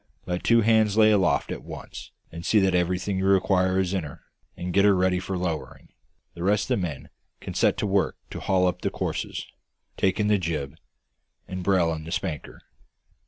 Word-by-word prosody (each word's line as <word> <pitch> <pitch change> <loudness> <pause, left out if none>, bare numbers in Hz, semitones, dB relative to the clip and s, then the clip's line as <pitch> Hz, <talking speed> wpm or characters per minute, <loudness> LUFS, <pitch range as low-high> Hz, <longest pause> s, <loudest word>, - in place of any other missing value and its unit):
Let 90 0 -3
two 115 0 +4
hands 110 -1 +3
lay 110 -1 +6
aft 95 -3 +2
at - - -5
once - - -9 0.2
and 85 +1 -8
see 110 - +2
that 95 -1 +2
everything 90 +2 0
you 95 - 0
require 95 -1 +3
is 95 0 0
in 95 -3 -1
her, 70 -2 -10 0.3
and 90 0 -4
get 100 - +4
her 100 -1 +5
ready 90 0 +2
for 95 0 -4
lowering. 85 -3 -4 0.4
The 85 - -10
rest 100 +3 +1
of - - +2
the 90 - 0
men 70 -5 -9 0.3
can - - -7
set - - +2
to - - -1
work 100 -1 +1
to - - -5
haul 95 -1 +2
up 90 - -1
the - - 0
courses, - - -4 0.5
take 95 +2 +1
in 105 - +2
the 105 -1 +3
jib, 75 -6 -3 0.7
and 95 0 -5
brail 90 -3 +2
in 80 -1 -6
the 80 - -8
spanker. 80 -5 -4
95 Hz, 205 wpm, -25 LUFS, 90-100 Hz, 0.7 s, lay